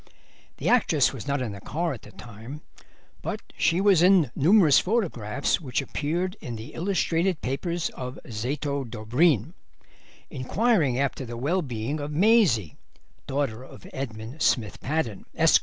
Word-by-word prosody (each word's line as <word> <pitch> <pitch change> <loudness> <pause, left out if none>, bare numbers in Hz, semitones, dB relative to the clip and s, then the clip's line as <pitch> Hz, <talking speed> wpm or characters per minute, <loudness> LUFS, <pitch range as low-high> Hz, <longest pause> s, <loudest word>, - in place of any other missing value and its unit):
The - - -3
actress - - +3
was - - -8
not 140 -2 0
in 115 - -3
the 100 -1 -9
car 165 - -2
at 120 - -9
the 105 - -14
time, 120 +7 -10 0.6
but - - -3 0.2
she 165 +3 +2
was 195 -4 +5
in 180 -8 +5
numerous 165 0 +6
photographs 165 - 0
which 130 -6 -2
appeared 170 +8 -2
in 120 - -5
the 110 +1 -9
illustrated 180 -1 0
papers 170 +6 -2
of 125 +1 -7
Zoto 140 +5 -2
Dobreen 125 - +1 0.8
inquiring 155 - +1
after 140 0 -1
the 120 -1 -6
well 160 +10 0
being 125 +1 -3
of 145 0 -4
Maisie, 160 - +3 0.5
daughter 135 -5 -1
of - - -13
Edmund 120 +1 -6
Smith 110 -6 +1
Paddon, 130 -9 -2
Esq. - - +6
140 Hz, 145 wpm, -26 LUFS, 120-170 Hz, 0.8 s, numerous